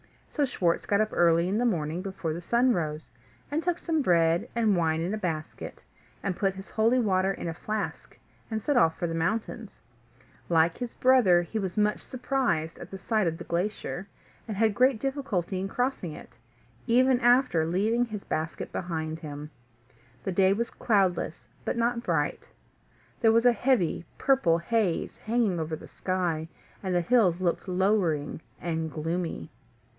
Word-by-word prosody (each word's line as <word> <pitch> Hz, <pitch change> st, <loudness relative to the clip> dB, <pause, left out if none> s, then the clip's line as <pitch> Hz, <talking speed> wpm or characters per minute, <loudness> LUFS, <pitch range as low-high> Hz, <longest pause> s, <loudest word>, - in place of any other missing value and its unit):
So 290 Hz, -, +3 dB
Schwartz 175 Hz, -9 st, 0 dB
got 205 Hz, +1 st, +3 dB
up 215 Hz, -, +1 dB
early 170 Hz, 0 st, +3 dB
in 200 Hz, +4 st, 0 dB
the 245 Hz, -, +1 dB
morning 165 Hz, -6 st, -1 dB
before 180 Hz, -5 st, -4 dB
the 170 Hz, -, -5 dB
sun 240 Hz, +7 st, +3 dB
rose, 155 Hz, -4 st, -3 dB, 0.4 s
and 305 Hz, +2 st, 0 dB
took 350 Hz, 0 st, 0 dB
some 325 Hz, -3 st, 0 dB
bread 170 Hz, -6 st, +2 dB
and 220 Hz, -4 st, +3 dB
wine 160 Hz, -2 st, +1 dB
in 175 Hz, +5 st, -2 dB
a -, -, -1 dB
basket, 165 Hz, -6 st, -5 dB, 0.4 s
and 190 Hz, -2 st, -1 dB
put 195 Hz, -1 st, 0 dB
his 195 Hz, +1 st, -10 dB
holy 225 Hz, +3 st, +3 dB
water 195 Hz, -5 st, +2 dB
in 180 Hz, -, -5 dB
a 165 Hz, -, -2 dB
flask, 215 Hz, +6 st, -5 dB, 0.3 s
and 220 Hz, -2 st, -3 dB
set 290 Hz, -3 st, +1 dB
off 165 Hz, -9 st, +4 dB
for -, -, -2 dB
the 165 Hz, -, -2 dB
mountains. 180 Hz, +7 st, -2 dB, 0.7 s
Like 165 Hz, 0 st, +3 dB
his 245 Hz, -2 st, -5 dB
brother, 235 Hz, -10 st, +5 dB
he 220 Hz, +6 st, -4 dB
was 190 Hz, 0 st, -4 dB
much 210 Hz, 0 st, +2 dB
surprised 245 Hz, -, -1 dB
at -, -, -9 dB
the 195 Hz, -, -7 dB
sight 215 Hz, +1 st, 0 dB
of 165 Hz, 0 st, -1 dB
the -, -, -7 dB
glacier, 190 Hz, +1 st, -3 dB, 0.4 s
and 215 Hz, -3 st, -4 dB
had 220 Hz, 0 st, +3 dB
great 255 Hz, +1 st, +3 dB
difficulty 235 Hz, -, -2 dB
in 190 Hz, -, -2 dB
crossing 245 Hz, -, -2 dB
it, -, -, -12 dB, 0.5 s
even 255 Hz, +2 st, +4 dB
after 245 Hz, -8 st, +4 dB
leaving 215 Hz, +8 st, +1 dB
his 215 Hz, -4 st, -7 dB
basket 160 Hz, +1 st, -3 dB
behind 160 Hz, -3 st, -3 dB
him. 150 Hz, -1 st, -7 dB, 0.7 s
The 190 Hz, -, -2 dB
day 190 Hz, +1 st, +4 dB
was 235 Hz, +3 st, -2 dB
cloudless, 190 Hz, -7 st, 0 dB, 0.2 s
but -, -, -2 dB
not 235 Hz, 0 st, +1 dB
bright: -, -, -1 dB, 0.7 s
there 225 Hz, -2 st, +4 dB
was 230 Hz, +1 st, +3 dB
a 245 Hz, -, +8 dB
heavy 215 Hz, -8 st, +1 dB
purple 255 Hz, -12 st, +3 dB
haze 190 Hz, 0 st, -1 dB
hanging 220 Hz, -6 st, 0 dB
over 160 Hz, 0 st, -2 dB
the -, -, -12 dB
sky, 175 Hz, -4 st, -2 dB, 0.3 s
and 185 Hz, -2 st, -1 dB
the 175 Hz, -, +3 dB
hills 185 Hz, -3 st, +3 dB
looked 185 Hz, +1 st, -1 dB
lowering 180 Hz, -6 st, +1 dB, 0.2 s
and 160 Hz, -2 st, -2 dB
gloomy. 165 Hz, +3 st, -3 dB
190 Hz, 170 wpm, -28 LUFS, 170-230 Hz, 0.7 s, a